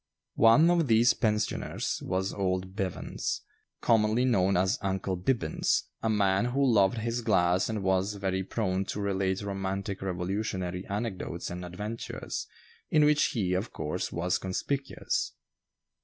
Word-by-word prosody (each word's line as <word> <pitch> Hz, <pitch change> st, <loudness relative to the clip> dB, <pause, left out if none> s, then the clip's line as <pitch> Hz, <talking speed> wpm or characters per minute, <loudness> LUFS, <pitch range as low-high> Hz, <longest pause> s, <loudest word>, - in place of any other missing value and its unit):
One 140 Hz, +10 st, +7 dB
of 170 Hz, -4 st, +2 dB
these 115 Hz, +1 st, +5 dB
pensioners 105 Hz, -1 st, -1 dB
was 95 Hz, +1 st, -1 dB
old 95 Hz, -1 st, -2 dB
Bevans, 95 Hz, -4 st, -3 dB, 0.4 s
commonly 110 Hz, +1 st, +3 dB
known 100 Hz, -6 st, +3 dB
as 95 Hz, +1 st, +2 dB
"Uncle 95 Hz, -1 st, -1 dB
Bibbins," 90 Hz, -3 st, 0 dB, 0.2 s
a 115 Hz, -, 0 dB
man 100 Hz, -1 st, +2 dB
who 135 Hz, +3 st, +1 dB
loved 110 Hz, -3 st, +4 dB
his 115 Hz, +2 st, -2 dB
glass 90 Hz, -3 st, +2 dB
and 110 Hz, -3 st, -2 dB
was 95 Hz, +2 st, +1 dB
very 95 Hz, -1 st, -1 dB
prone 95 Hz, -2 st, -1 dB
to 105 Hz, -, -4 dB
relate 95 Hz, -1 st, 0 dB
romantic 95 Hz, 0 st, -3 dB
Revolutionary 95 Hz, 0 st, -3 dB
anecdotes 100 Hz, -5 st, -4 dB
and 90 Hz, +1 st, -5 dB
adventures, 105 Hz, +6 st, -5 dB, 0.4 s
in 150 Hz, -1 st, +5 dB
which 150 Hz, 0 st, +4 dB
he, 95 Hz, -6 st, 0 dB
of 95 Hz, +5 st, -1 dB
course, 75 Hz, -1 st, -3 dB
was 85 Hz, +1 st, 0 dB
conspicuous. 135 Hz, +9 st, -2 dB
100 Hz, 135 wpm, -29 LUFS, 95-115 Hz, 0.4 s, One